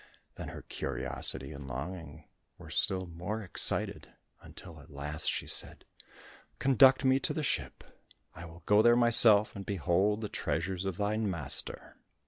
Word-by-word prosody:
Then - - -10
her - - -11
curiosity 65 +2 -3
and 70 -2 -11
longing 75 +3 -9 0.3
were - - -14
still 95 -1 0
more 90 +6 -7
excited, 90 - +5 0.3
until 85 -3 -14
at 70 - -18
last 75 +2 -5
she - - -4
said, - - -5 0.7
"Conduct 135 +1 +3
me 130 +1 +2
to - - -3
the 155 - -4
ship, - - -4 0.5
I 85 - -12
will 85 +1 -15
go 105 +1 +3
there 120 +1 +4
myself, 115 -3 +5
and 100 - -8
behold 100 +3 -2
the 105 - -5
treasures 90 +3 -5
of 95 -3 -5
thine 105 +1 -3
master." 80 -8 -4
95 Hz, 150 wpm, -29 LUFS, 80-110 Hz, 0.7 s, excited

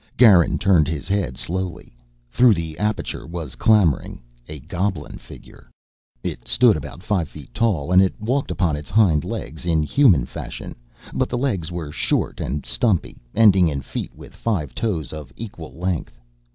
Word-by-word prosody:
Garin 100 -9 +6
turned 90 -7 +3
his 75 -2 -4
head 95 -10 -1
slowly. 90 -4 -4 0.4
Through 120 - +5
the 80 -2 -4
aperture 105 -6 -2
was 85 -6 -6
clambering 90 - +2 0.3
a 75 - -6
goblin 85 -1 -3
figure. - - -15 0.5
It - - -5
stood 120 -4 +4
about 75 +4 -7
five 95 -7 0
feet 75 -3 -12
tall, 105 -9 0
and 90 +1 +7
it 95 - 0
walked 130 +6 -1
upon 85 -6 0
its 75 0 -8
hind 90 -8 +3
legs 80 - -6
in 80 -3 +1
human 90 - +4
fashion, - - -7 0.4
but - - 0
the 120 - -2
legs 100 - -1
were 85 -4 -5
short - - -1
and 75 +1 -3
stumpy, 85 - 0 0.2
ending 95 -5 +6
in 70 -3 -2
feet - - -6
with - - -13
five 90 - -2
toes 85 - -2
of 75 -3 -8
equal 100 -8 -8
length. 90 -7 -3
85 Hz, 165 wpm, -22 LUFS, 75-105 Hz, 0.5 s, and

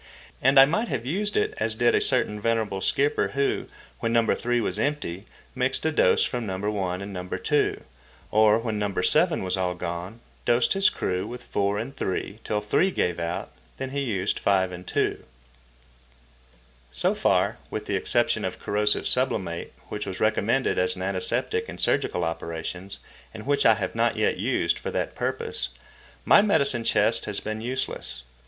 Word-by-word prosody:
And 135 +1 +6
I 135 - +10
might 210 +11 0
have 120 - -3
used 205 +9 0
it - - +1
as 110 0 0
did 120 +1 +3
a - - +3
certain 120 -5 +1
venerable 110 -3 0
skipper, 145 +7 +2
who, 140 0 0 0.3
when 115 - -1
No. 115 -1 +3
3 120 0 0
was 105 -3 -1
empty, 110 - -2 0.3
mixed 130 +3 0
a 160 - +2
dose 120 -11 +4
from 120 -3 -3
No. 95 -1 -3
1 100 -2 -2
and 100 0 -7
No. 90 -1 -5
2, - - 0 0.5
or, 110 0 +5
when 110 -2 -2
No. 105 -1 -1
7 - - +3
was 95 0 0
all 90 -1 -1
gone, 90 +5 -5 0.2
dosed 120 0 +3
his 195 0 +4
crew 90 +2 -2
with 120 +1 -8
4 100 0 0
and 125 +6 -5
3 100 +3 -3
till 105 -1 -1
3 105 - +2
gave 90 - -1
out, 85 0 -3 0.3
when 130 0 -4
he 140 - -2
used 105 -7 -1
5 95 -2 +2
and 90 0 -9
2. - - -1 1.7
So - - +1
far, - - +1
with - - -4
the - - -1
exception - - +1
of - - -3
corrosive 105 0 0
sublimate 95 -10 0 0.2
(which 105 -1 -4
was 95 - -5
recommended 110 - +1
as 475 -2 +2
an - - -5
antiseptic 455 0 -1
in - - -7
surgical 90 - 0
operations, 85 +4 -4 0.4
and 110 - -8
which 140 -2 +3
I 110 - +6
have 95 -4 -3
not 115 0 +1
yet - - +1
used - - 0
for - - -4
that - - -2
purpose), - - -2 0.6
my - - +7
medicine 140 - +2
chest 110 +1 +2
has 105 -2 -1
been 110 0 -4
useless. 115 - -4
110 Hz, 175 wpm, -25 LUFS, 95-130 Hz, 1.7 s, I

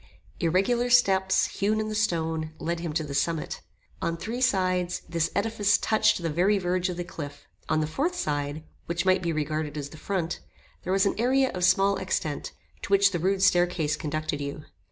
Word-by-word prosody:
Irregular 195 +8 +2
steps, 190 -6 +4
hewn 210 +2 0
in 215 - -1
the 215 - -3
stone, 160 -6 -1
led 170 0 -2
him 170 -2 -3
to 160 0 0
the 145 -2 -6
summit. 160 +2 -1 0.4
On 165 0 -1
three 230 +8 -4
sides, 185 -6 +1
this 165 -1 0
edifice 205 0 +2
touched 215 -2 +2
the 165 - 0
very 185 +6 +3
verge 180 0 0
of 175 - -4
the 175 - -2
cliff. 145 -4 -8 0.2
On 155 0 +2
the - - +1
fourth 290 - -1
side, 145 - -2 0.2
which 170 +2 -1
might 185 0 +4
be 170 -2 -1
regarded 155 -1 -2
as 140 -1 -4
the 155 - -12
front, 175 0 -2 0.4
there 185 - -4
was 195 +1 +3
an 200 - +2
area 260 +2 +3
of 180 - -4
small 195 +2 +4
extent, 170 -6 -2 0.3
to - - -6
which 200 0 +5
the 175 - -2
rude 190 +3 +1
staircase 175 -5 +3
conducted 155 -1 -3
you. 140 +1 -5
180 Hz, 195 wpm, -27 LUFS, 155-200 Hz, 0.4 s, which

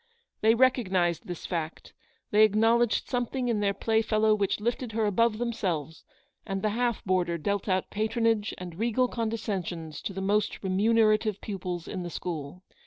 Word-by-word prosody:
They 220 +1 +5
recognised 190 - +2
this 175 -2 -6
fact, 165 -2 -4 0.4
they 210 - +5
ac 215 -1 +5
knowledged 230 +1 +3
something 245 0 -1
in 225 -3 +1
their 200 -1 +1
playfellow 220 0 +2
which 200 -1 0
lifted 235 +1 -2
her 220 0 +1
above 215 +2 +2
themselves, 180 - -3 0.4
and 195 0 -4
the 215 - +2
half 240 0 -1
boarder 180 -3 +1
dealt 200 +5 -2
out 185 0 0
patronage 220 0 +1
and 180 -1 -8
regal 240 +3 +2
condescensions 195 -9 -3
to - - -4
the 190 - -5
most 205 +3 0
remunerative 215 +1 +2
pupils 180 -4 -5
in 185 - -4
the 175 - -5
school. 165 0 -6
210 Hz, 160 wpm, -28 LUFS, 185-225 Hz, 0.4 s, They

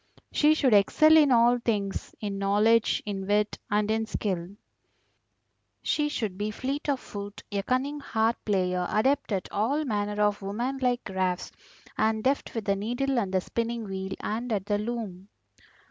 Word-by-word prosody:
She 305 +1 +4
should 265 -7 +3
excel 310 +10 +6
in 300 -3 +6
all 240 0 +5
things, 205 -4 -2
in 200 -2 -4
knowledge, 210 +3 +3
in 195 -2 -4
wit, 210 +1 +1
and 210 +1 +1
in 220 0 0
skill; 190 -3 -3 1.3
she 295 -1 +1
should 210 -9 -3
be 210 +1 -1
fleet 275 +7 -3
of 275 -2 +1
foot, 205 -2 -8
a 200 -1 0
cunning 265 +7 -1
harp 230 -4 0
player, 180 -3 0
adept 260 +4 +1
at 195 -2 -1
all 275 +9 0
manner 210 -3 -2
of 205 0 +1
woman 240 +7 -3
like 250 -1 +1
crafts, 185 -2 -2 0.5
and 220 0 +1
deft 270 -1 0
with 225 -3 -3
the 200 - +2
needle 245 +6 -1
and 195 -5 -2
the 190 -1 +1
spinning 235 +3 -3
wheel, 190 -1 -4
and 230 +3 -3
at 200 -3 -1
the 205 -1 0
loom. 210 -4 -5
215 Hz, 165 wpm, -27 LUFS, 200-245 Hz, 1.3 s, excel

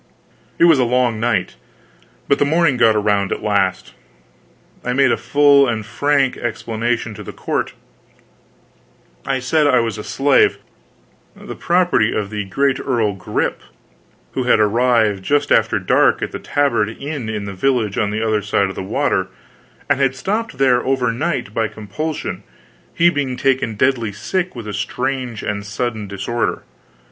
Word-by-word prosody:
It - - +3
was 165 -5 +6
a - - +4
long 120 -2 +1
night, 115 - -1 0.7
but 140 - +2
the - - +4
morning 160 -1 +2
got 110 -3 +4
around 100 -2 +1
at - - -3
last. 95 -3 0 0.9
I 125 - -1
made 135 -1 +3
a - - +3
full 140 -1 +4
and 110 -3 -2
frank 140 +2 +1
explanation 115 0 -2
to - - -10
the - - -8
court. - - -3 1.5
I 135 -1 +1
said 145 +4 +1
I 130 -3 +4
was 115 -3 -2
a - - -5
slave, 145 - +2 0.8
the - - -9
property 175 - +2
of 100 -1 -3
the 105 -1 -3
great 135 +7 0
Earl 115 -6 0
Grip, 95 - -2 0.7
who 130 - -2
had - - +4
arrived 110 -2 +2
just 145 +7 0
after - - +3
dark - - +2
at - - -3
the - - -6
Tabard 120 -7 0
inn 135 0 -6
in 105 -2 -4
the 100 - -6
village 110 0 0
on 105 - +1
the 110 +2 -2
other 110 -1 +1
side 100 -1 0
of 95 - -7
the - - -4
water, 95 - 0 0.6
and 140 -1 +1
had 135 -1 +2
stopped 210 - -3
there 130 -2 +3
over 130 -2 +1
night, 125 - -3
by 115 0 0
compulsion, 145 +10 -5 0.5
he 175 +1 +3
being 140 -5 -2
taken 130 -4 0
deadly 120 -2 +1
sick 180 - -3
with 115 -3 -7
a 105 - -5
strange 125 -2 -3
and 100 -1 -3
sudden 105 +1 -4
disorder. 100 +5 -2
120 Hz, 165 wpm, -19 LUFS, 105-140 Hz, 1.5 s, was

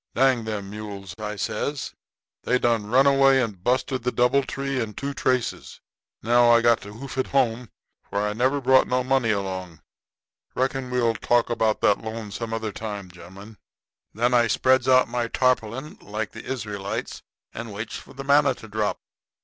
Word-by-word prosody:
'Dang 130 -3 +3
them 100 -3 -4
mules,' 100 -3 -7
I 105 0 -4
says; 140 +7 -3 0.5
'they 125 - +1
done 115 -4 +1
run 130 +5 +4
away 135 -1 +5
and 105 -8 -3
busted 130 +2 0
the 125 +1 -1
doubletree 135 +1 0
and 105 -3 -5
two 140 0 -3
traces. 130 -3 -1 0.4
Now 120 +2 +4
I 115 0 +6
got 120 -1 +3
to 105 +1 -10
hoof 130 +3 -7
it 130 - 0
home, 125 -3 0 0.4
for 100 - -1
I 105 - -2
never 130 +6 +1
brought 130 0 +4
no 125 0 +1
money 130 -2 +1
along. 95 -5 -3 0.7
Reckon 130 0 -1
we'll 120 -2 +1
talk 120 +1 +1
about 110 -2 +1
that 105 - +3
loan 110 -1 -6
some 115 +2 -5
other 110 -1 -3
time, 100 -4 -6
gen'lemen.' 95 +5 -13 0.5
"Then 120 +3 0
I 120 -1 +4
spreads 130 +4 +2
out 130 -1 +5
my 120 0 -2
tarpaulin, 125 +3 -1
like 105 +1 -4
the 110 - -10
Israelites, 105 -6 -4 0.3
and 115 -1 -6
waits 105 +3 -6
for - - -10
the 135 - -6
manna 140 +1 +4
to 110 - -12
drop. 105 0 -1
115 Hz, 175 wpm, -24 LUFS, 105-130 Hz, 0.7 s, I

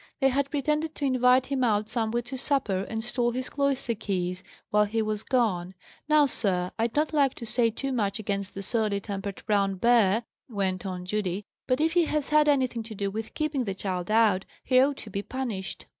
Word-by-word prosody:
They 270 - +4
had 280 +1 0
pretended 300 +2 -1
to 285 - -2
invite 255 -1 +4
him 270 -1 -1
out 215 -3 +2
somewhere 235 0 -1
to 260 +3 -7
supper, 245 -8 0
and 225 0 -3
stole 240 0 0
his 255 +1 -3
cloister 280 -4 0
keys 185 -4 -2 0.3
while 210 0 +4
he 220 +2 -2
was 215 -1 -2
gone. 190 -8 0 0.3
Now, 305 -1 +6
sir, 185 -8 0
I'd 225 0 0
not 300 +2 +1
like 280 -3 +3
to 235 - -7
say 235 +1 +2
too 270 +5 -4
much 205 -6 0
against 200 -2 -3
that 195 - -3
surly 215 -2 +1
tempered 200 -1 -5
brown 200 -2 +2
bear," 225 +1 +3 0.3
went 195 -3 -2
on 180 -1 -5
Judy, 195 0 -2 0.2
"but 255 +1 +2
if 320 +1 +2
he 345 -1 +4
has 300 -2 -1
had 300 0 +4
anything 255 -4 +1
to 220 0 -8
do 200 0 -2
with 220 +2 -6
keeping 300 -5 -1
the 195 -2 -3
child 185 -2 -3
out, 215 -4 +4 0.2
he 255 -1 +4
ought 275 +1 +2
to 215 - -8
be 200 - -2
punished." 225 -6 -5
225 Hz, 205 wpm, -27 LUFS, 200-265 Hz, 0.3 s, Now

